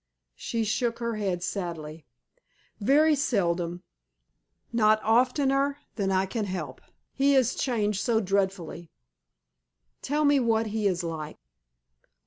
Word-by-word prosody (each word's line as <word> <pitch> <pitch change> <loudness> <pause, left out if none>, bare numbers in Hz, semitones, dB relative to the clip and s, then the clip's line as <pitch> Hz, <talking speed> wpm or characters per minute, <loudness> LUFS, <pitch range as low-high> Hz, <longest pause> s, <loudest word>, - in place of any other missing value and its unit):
She 230 - -2
shook 230 +2 -1
her 235 -2 -3
head 185 -4 -2
sadly. 165 -5 -5 0.7
"Very 300 +8 +4
seldom. 175 - 0 0.9
Not 215 -1 +4
oftener 270 +4 +2 0.2
than 195 -3 -1
I 190 0 +2
can 210 +3 -3
help. 185 -1 -5 0.3
He 275 +1 +3
is 255 -3 +3
changed 210 -6 -1
so 230 -3 +2
dreadfully." 190 -4 -2 1.1
"Tell 295 +2 0
me 285 -1 +5
what 225 -2 +1
he 215 -2 +1
is 180 -2 -1
like." 160 -2 -5
215 Hz, 115 wpm, -27 LUFS, 185-250 Hz, 1.1 s, me